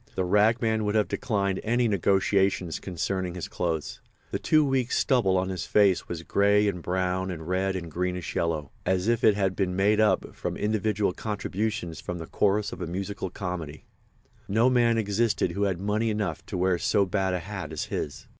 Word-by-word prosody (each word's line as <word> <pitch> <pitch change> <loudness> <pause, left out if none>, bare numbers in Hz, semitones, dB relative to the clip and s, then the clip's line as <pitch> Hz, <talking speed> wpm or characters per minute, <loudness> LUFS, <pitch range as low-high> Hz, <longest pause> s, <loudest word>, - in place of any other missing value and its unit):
The 95 - 0
ragman 110 +3 +2
would 105 +1 -1
have 105 -1 +3
declined 100 -4 -1
any 120 +2 +2
negotiations 95 -3 +1
concerning 90 0 -3
his 90 - -5
clothes. 80 -3 -3 0.3
The - - -2
two 155 -1 +3
weeks' 130 -3 0
stubble 105 -8 +3
on 95 +1 0
his 90 -3 -4
face 100 -3 +3
was 85 -1 -5
grey 100 +3 +3
and 90 -4 -2
brown 95 +1 -1
and 80 -3 -6
red 95 +1 0
and 85 -3 -5
greenish 90 +1 -3
yellow—as 85 +4 -1
if 115 0 +1
it 105 - +6
had 95 -2 0
been 90 -2 -1
made 105 +3 +3
up 105 -4 +2
from - - -4
individual 105 -2 0
contributions 105 -4 -3
from 90 - -5
the 80 - -6
chorus 105 +4 +1
of - - -8
a 90 - -3
musical 95 +2 -4
comedy. 85 -6 -6 0.6
No 115 +5 +3
man 120 -2 +3
existed 105 -3 +1
who 100 +4 0
had 95 -3 -1
money 105 +3 0
enough 105 -7 -2
to - - -4
wear 90 -1 +2
so 105 -1 +2
bad 95 -1 0
a - - -1
hat 95 -3 -6
as 80 - -3
his. 75 - -4
95 Hz, 185 wpm, -27 LUFS, 90-105 Hz, 0.6 s, it